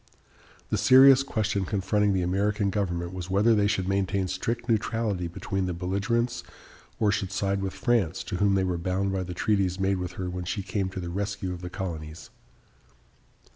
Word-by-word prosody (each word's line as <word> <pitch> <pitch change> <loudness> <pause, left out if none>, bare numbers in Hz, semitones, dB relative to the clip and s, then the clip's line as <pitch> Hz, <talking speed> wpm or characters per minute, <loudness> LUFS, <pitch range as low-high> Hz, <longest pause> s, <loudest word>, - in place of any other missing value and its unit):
The - - +1
serious 130 +1 +7
question 110 -6 -1
confronting 100 +1 +1
the 95 -1 +1
American 100 +3 0
government 90 -3 -2
was 90 -1 -6
whether 105 +5 +4
they 105 -2 +3
should 95 -3 0
maintain 95 -1 0
strict 115 +6 -3
neutrality 110 -5 0
between 95 +2 -3
the 90 - -3
belligerents 100 +7 -1 0.6
or 105 -2 +3
should 100 -2 -2
side 100 +1 -1
with 95 -1 -3
France, 100 -8 0
to 95 - -4
whom 100 +1 +3
they 95 - +2
were 90 -2 -1
bound 95 +3 -1
by 95 - -1
the 90 -1 -5
treaties 95 -2 +1
made 95 0 +1
with 90 -1 -4
her 95 - -4
when 90 0 -4
she 95 +2 -3
came 95 -1 -2
to 95 - -6
the 85 -1 -5
rescue 100 -1 -3
of 90 - -8
the 90 - -6
colonies. 85 -4 -6
95 Hz, 185 wpm, -27 LUFS, 90-105 Hz, 0.6 s, serious